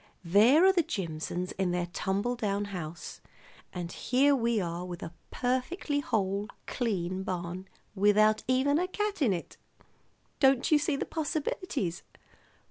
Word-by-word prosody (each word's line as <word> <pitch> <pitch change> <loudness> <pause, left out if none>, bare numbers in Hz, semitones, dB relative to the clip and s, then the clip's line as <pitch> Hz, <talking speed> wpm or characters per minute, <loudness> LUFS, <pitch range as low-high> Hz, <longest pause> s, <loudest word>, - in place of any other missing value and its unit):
There 225 - +6
are 385 - +6
the 355 - +4
Jimsons 180 - -3
in 190 -2 +1
their 175 0 0
tumble 200 +8 -1
down 205 -3 -1
house, 165 -2 -6 0.5
and 175 -1 -5
here 270 +8 +3
are - - +4 0.5
we 180 - -7
with 175 -1 -6
a 165 - -7 0.2
perfectly 260 +4 -1
whole, 200 -5 -1 0.2
clean 190 -6 -2
barn 180 0 -4 0.3
without 210 +2 +4
even 265 +4 +3
a 365 - 0
cat 410 -1 -2
in 245 -7 +4
it. 175 -3 -4 0.8
Don't 265 0 +4
you 305 - +6
see 300 -1 0
the - - -2
possibilities? 300 - -2
215 Hz, 140 wpm, -29 LUFS, 180-285 Hz, 0.8 s, There